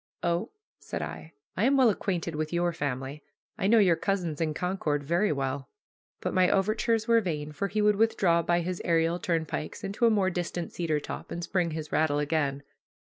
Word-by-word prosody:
"Oh," 170 0 0 0.3
said - - -5
I, 160 - -8 0.2
"I 205 - +1
am 275 +2 +4
well 250 -4 +6
acquainted 175 -4 -2
with 155 0 -3
your 175 0 +1
family. 140 -1 -4 0.3
I 195 - -1
know 230 +3 +5
your 190 -6 +5
cousins 175 -5 -2
in 155 -2 0
Concord 160 -6 -1
very 170 +8 +1
well." 135 -1 -2 0.5
But - - -2
my 185 -1 +4
overtures 215 +3 +1
were 230 -1 +5
vain, 155 -6 -3
for 150 +7 -2
he 210 +2 0
would 210 -1 +4
withdraw 190 -6 +3
by 175 +1 +1
his 180 +1 -3
aerial 165 +1 +2
turnpikes 165 +1 -2
into 200 +4 +1
a - - +6
more 200 -4 +2
distant 175 -1 -3
cedar 160 -3 0
top, - - -7
and 170 - -5
spring 175 0 0
his 155 -1 -5
rattle 155 -1 +2
again. 145 -2 0
170 Hz, 190 wpm, -28 LUFS, 155-195 Hz, 0.5 s, well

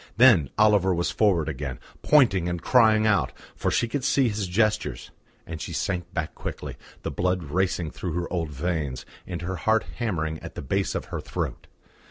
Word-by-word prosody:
Then 110 - +6
Oliver 105 -4 +4
was 85 +1 0
forward 90 -8 +2
again, 70 -4 -4 0.2
pointing 100 - +4
and 85 0 -2
crying 110 0 +4
out, 105 -2 +2 0.2
for - - -1
she 120 - +1
could 135 +3 -3
see 135 -2 +3
his 105 -2 -2
gestures; 105 - 0 0.3
and 80 -1 -7
she - - -5
sank 90 -2 -2
back 80 -4 -3
quickly, - - -6 0.3
the - - -3
blood 90 0 0
racing 85 +1 -1
through 90 -4 -5
her 85 +1 -3
old 85 -3 -1
veins, 75 -3 -3 0.2
and 85 -2 -5
her 95 +1 -3
heart 110 +6 +2
hammering 80 -9 -2
at - - -9
the - - -5
base 95 +9 -1
of - - -3
her - - -2
throat. - - -4
90 Hz, 185 wpm, -25 LUFS, 80-110 Hz, 0.3 s, Then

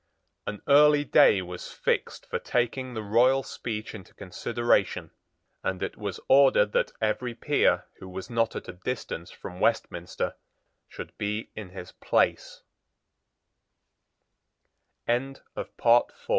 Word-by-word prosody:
An 105 - -5
early 145 +1 +6
day 100 -7 +5
was 90 0 -8
fixed - - -2
for - - -3
taking 125 +1 -1
the 110 - -3
royal 125 +6 +3
speech 110 -3 -5
into 100 -5 -11
consideration; 120 +5 0 0.5
and 95 - -2
it - - -3
was - - -5
ordered 135 -6 +5
that - - +1
every 115 +2 -1
peer 145 +4 +2
who 95 - -10
was 95 +1 -7
not 115 -1 0
at - - -6
a 90 - -6
distance 90 -3 -5
from 90 -1 -10
Westminster 95 -5 -1 0.5
should - - -9
be 105 +2 -3
in 105 -4 -7
his 90 -1 -10
110 Hz, 115 wpm, -27 LUFS, 95-125 Hz, 0.5 s, early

